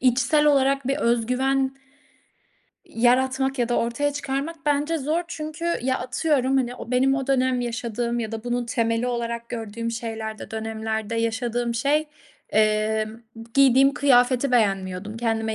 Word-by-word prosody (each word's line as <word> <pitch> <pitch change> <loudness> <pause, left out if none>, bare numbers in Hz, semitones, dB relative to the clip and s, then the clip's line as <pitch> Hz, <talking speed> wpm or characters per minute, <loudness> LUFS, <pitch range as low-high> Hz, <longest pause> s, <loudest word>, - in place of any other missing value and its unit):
içsel 260 +4 +3
olarak 275 -2 +3
bir 275 - +1
öz 235 -4 +1
güven 265 +2 +1 1.1
yaratmak 260 +3 +1
ya 240 -1 +1
da 240 - +1
ortaya 260 +5 0
çıkarmak 280 +3 -3
bence 295 +3 +1
zor. 310 +5 -1
Çünkü 310 0 -6 0.2
ya, 260 +1 0
atıyorum, 270 0 0
hani, 245 -2 0
o 240 - -9
benim 265 +2 +3
o 270 -1 -2
dönem 260 -2 +2
yaşadığım 235 0 -2
ya 220 -1 -4
da 220 0 -5
bunun 245 0 -1
temeli 230 +1 0
olarak 235 -1 -3
gördüğüm 230 0 -4
şeylerde, 225 -1 -5
dönemlerde 220 0 -3
yaşadığım 235 +1 -1
şey, 290 +6 +1 0.4
emm, 215 +1 +1 0.3
giydiğim 275 0 +5
kıyafeti 255 -1 +3
beğenmiyordum, 195 -2 0
kendime 225 -1 -1
245 Hz, 140 wpm, -24 LUFS, 230-270 Hz, 1.1 s, giydiğim